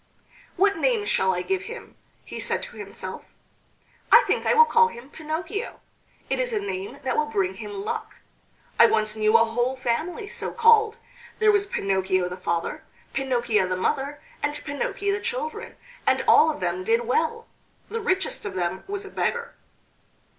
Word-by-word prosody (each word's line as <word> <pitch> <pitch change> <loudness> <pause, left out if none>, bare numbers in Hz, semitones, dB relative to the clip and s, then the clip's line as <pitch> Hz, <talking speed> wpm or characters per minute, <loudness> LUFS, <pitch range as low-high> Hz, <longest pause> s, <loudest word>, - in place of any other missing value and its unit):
"What 395 0 +3
name 445 +3 +1
shall 190 - +2
I 180 -1 -2
give 385 0 -1
him?" 475 +1 -9 0.3
he - - -7
said - - -1
to - - -9
himself; - - -7 0.9
"I 485 - +9
think - - 0
I - - +4
will 470 0 +8
call 470 0 +5
him 260 - -11
Pinocchio. 320 +8 -4 0.5
It - - -1
is - - 0
a 430 - +1
name 405 0 -5
that - - -1
will 455 0 +1
bring 395 -4 0
him 405 -1 -7
luck. 450 0 -4 0.6
I 235 - +9
once 215 -1 +1
knew 215 +1 +4
a 230 - +4
whole 240 +3 -1
family 315 - -2
so - - -3
called. 450 -1 +5 0.4
There 430 -1 +5
was 405 -1 +2
Pinocchio 190 - 0
the 180 - -5
father, 170 -2 -3 0.3
Pinocchia 240 -7 +1
the 185 - -1
mother, 275 +9 -1 0.2
and 290 0 -1
Pinocchi 340 +8 -2
the 400 +1 -1
children, 465 0 -4 0.3
and - - +3
all 315 - +7
of 305 - -4
them 180 +1 -1
did 230 +4 +2
well. 320 - 0 0.4
The 460 - -4
richest 380 -4 -1
of 200 -2 -5
them 180 +1 -2
was 400 0 -4
a - - -8
beggar." 475 0 -2
335 Hz, 175 wpm, -25 LUFS, -, 0.9 s, I